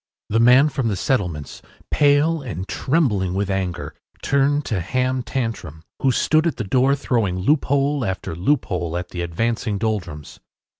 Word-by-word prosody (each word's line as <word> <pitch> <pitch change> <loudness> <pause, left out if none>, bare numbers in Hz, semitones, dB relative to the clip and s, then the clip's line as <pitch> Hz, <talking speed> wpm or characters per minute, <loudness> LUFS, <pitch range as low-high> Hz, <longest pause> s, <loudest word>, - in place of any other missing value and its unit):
” - - -72
The 115 - +2
man 125 +5 +6
from 135 -4 -2
the 105 - 0
settlements, 90 - -2 0.3
pale 145 +2 +3
and 95 - -6
trembling 105 - 0
with 100 0 -1
anger, 90 -2 -3 0.3
turned 145 +1 +2
to 105 - -1
Ham 130 +7 -1
Tantrum, 115 - -4 0.2
who 135 - +3
stood 155 +6 +2
at 165 - -1
the 115 - -2
door 130 +7 +2
throwing 115 -9 -1
loophole 140 +5 +1
after 95 -4 -3
loophole 90 - -1
at 90 0 -5
the 90 - -5
advancing 110 +5 -1
Doldrums. 90 -9 -4
115 Hz, 155 wpm, -21 LUFS, 90-135 Hz, 0.3 s, man